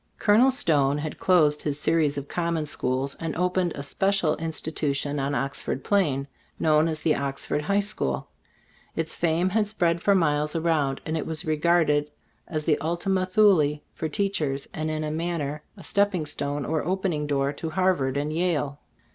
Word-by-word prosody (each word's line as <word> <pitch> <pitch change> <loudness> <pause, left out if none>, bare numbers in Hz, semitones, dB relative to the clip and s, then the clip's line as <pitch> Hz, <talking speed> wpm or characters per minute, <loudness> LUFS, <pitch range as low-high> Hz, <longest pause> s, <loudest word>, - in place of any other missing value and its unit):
Col 205 - +3
onel 260 +3 +6
Stone 145 - +2
had 150 +1 -5
closed 155 -5 +3
his 145 -1 -2
series 150 -3 +2
of 140 0 -4
common 170 -2 -1
schools, 135 -1 -2
and 165 -1 -3
opened 180 0 +1
a 140 - -5
spe 145 +6 -2
cial 180 -6 +2
institution 150 -3 -2
on 140 +1 -1
"Oxford 135 -1 -2
Plain, 145 -9 +1 0.3
known 155 0 +3
as 160 -1 -3
the 155 - +3
"Oxford 140 +1 -2
High 200 +7 +1
School. 70 - -1 0.7
Its 165 -1 -2
fame 170 +2 +1
had 210 +2 +1
spread 170 -5 0
for 200 +2 +4
miles 150 -3 +1
around, 160 -5 +1
and 160 - -2
it 160 - -2
was 160 -2 -3
regarded 155 -2 +2 0.4
as 155 -2 -3
the 150 -1 +2
Ultima 185 +3 0
Thule 185 -7 +4
for 160 - -3
teachers, 150 -7 -1
and 155 0 -2
in 155 0 -2
a 150 - -2
manner 155 -3 -2 0.2
a 190 - -11
stepping 200 -5 +1
stone 145 -1 -3
or 160 0 -1
opening 175 -4 -1
door 140 0 0
to 160 +3 -5
Harvard 160 -6 +1
and 150 +2 -1
Yale. 155 -4 0
155 Hz, 175 wpm, -25 LUFS, 145-175 Hz, 0.7 s, onel